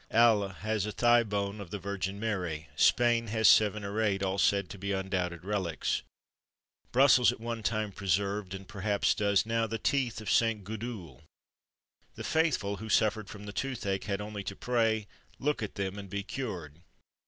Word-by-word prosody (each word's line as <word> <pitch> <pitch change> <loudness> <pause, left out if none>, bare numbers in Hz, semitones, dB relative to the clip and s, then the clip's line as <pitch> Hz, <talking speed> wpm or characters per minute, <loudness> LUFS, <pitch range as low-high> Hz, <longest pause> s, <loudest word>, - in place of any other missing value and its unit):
Halle 110 -3 +4
has 105 +1 -2
a - - -3
thigh 120 +2 +4
bone 100 -1 -3
of 95 - -9
the 105 - -4
Virgin 100 0 -4
Mary; 90 -8 -3
Spain 120 -1 +3
has 110 0 +3
seven 105 -1 +5
or 100 +2 -2
eight, 100 -3 +1
all 95 +1 -1
said 100 -2 +3
to 100 - -9
be 100 +1 -3
undoubted 90 -3 -2
relics. 95 -6 -1 0.9
Brussels 125 -2 +6
at 125 - -9
one 115 0 -4
time 110 -1 -1
preserved, 100 +1 -1
and 95 0 -9
perhaps 100 -2 +1
does 100 -1 +2
now, 115 0 0
the 115 +1 -3
teeth 120 0 0
of 110 -3 -3
St. 115 -3 +2
Gudule. 100 - -7 0.9
The - - -7
faithful, 140 -11 +1
who 110 +3 -8
suffered 110 -1 +2
from 105 0 -9
the 105 - -7
toothache, 100 -6 -2
had 100 0 -2
only 105 -1 -5
to 100 - -4
pray, 115 -3 +1 0.3
look 150 -1 -1
at 105 - -4
them, 100 0 -3
and 100 -1 -9
be 100 +1 -3
cured. 90 - -6
105 Hz, 175 wpm, -30 LUFS, 100-115 Hz, 0.9 s, Brussels